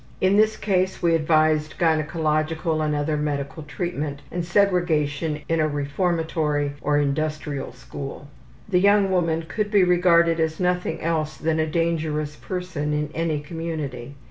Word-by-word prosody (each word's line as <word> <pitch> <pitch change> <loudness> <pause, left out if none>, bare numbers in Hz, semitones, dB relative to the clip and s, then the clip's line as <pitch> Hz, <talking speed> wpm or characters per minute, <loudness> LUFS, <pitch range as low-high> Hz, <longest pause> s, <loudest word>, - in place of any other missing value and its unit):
In 190 +1 +3
this 215 +1 +3
case 185 -3 0
we 170 -1 +4
advised 155 -1 +2
gynecological 155 0 0
and 150 -1 0
other 150 +1 0
medical 145 +1 -3
treatment 150 -2 -4
and 175 - -2
segregation 165 -5 +1
in 165 0 +1
a 155 - +3
reformatory 150 0 -1
or 145 0 +1
industrial 145 -1 -1
school. 135 +3 -8 0.4
The 185 -3 +2
young 200 0 +4
woman 165 -3 +1
could 210 +2 -2
be 205 -3 +4
regarded 170 -2 +4
as 160 -1 0
nothing 180 0 0
else 155 -2 -1
than 160 0 0
a 155 - +1
dangerous 155 -2 -1
person 170 -4 -4
in 150 0 -1
any 160 -2 -1
community. 145 -5 -5
160 Hz, 145 wpm, -23 LUFS, 150-175 Hz, 0.4 s, we